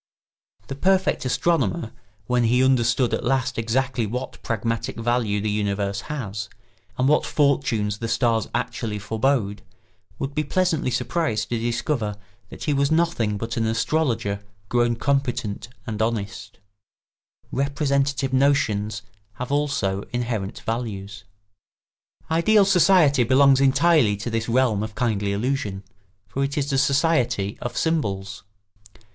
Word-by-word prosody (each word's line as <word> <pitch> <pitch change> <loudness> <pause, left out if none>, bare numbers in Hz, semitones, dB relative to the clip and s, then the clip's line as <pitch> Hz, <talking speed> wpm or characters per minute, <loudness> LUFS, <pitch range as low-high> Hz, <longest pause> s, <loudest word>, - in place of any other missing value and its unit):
The - - -6
perfect 190 +2 +1
astronomer, 125 - 0 0.3
when 125 +1 +1
he 125 +3 +3
understood 125 -1 +2
at - - -1
last 130 -1 0
exactly 120 +1 0
what 125 +5 -5
pragmatic 115 0 -2
value 115 -3 0
the 105 +1 -1
universe 100 -1 -1
has, 105 -9 -4 0.5
and 130 - +2
what 150 +2 +4
fortunes 130 -8 +1
the 115 - -3
stars 115 -2 +1
actually 120 -3 -2
forebode, 110 0 0 0.6
would 135 +3 -4
be 150 +1 0
pleasantly 165 -2 0
surprised 155 -3 -1
to 120 - -1
discover 120 -2 -1 0.3
that - - -9
he 150 - +1
was 140 0 +2
nothing 160 -11 +1
but 115 +2 -4
an 115 -1 +1
astrologer 115 -4 0 0.3
grown 120 -1 +2
competent 125 -5 -1 0.2
and 110 -3 -4
honest. 105 -2 -3
[Sidenote: - - -35 1.1
Representative 140 -2 0
notions 130 -6 +1 0.3
have 125 +6 -6
also 140 -10 0
inherent 115 -5 -3
values.] 100 -4 -5 1.1
Ideal 200 +5 +4
society 180 -8 +5
belongs 135 +2 +5
entirely 135 -5 +4
to 110 +4 -5
this 115 0 -2
realm 120 -4 +2
of 110 0 -5
kindly 105 -5 0
illusion, 105 -3 -2 0.4
for 135 - -2
it 140 +1 -2
is 140 0 -1
the 135 - +2
society 135 -8 +1
of 120 - -4
symbols. 100 -12 -1
120 Hz, 130 wpm, -23 LUFS, 105-140 Hz, 1.1 s, society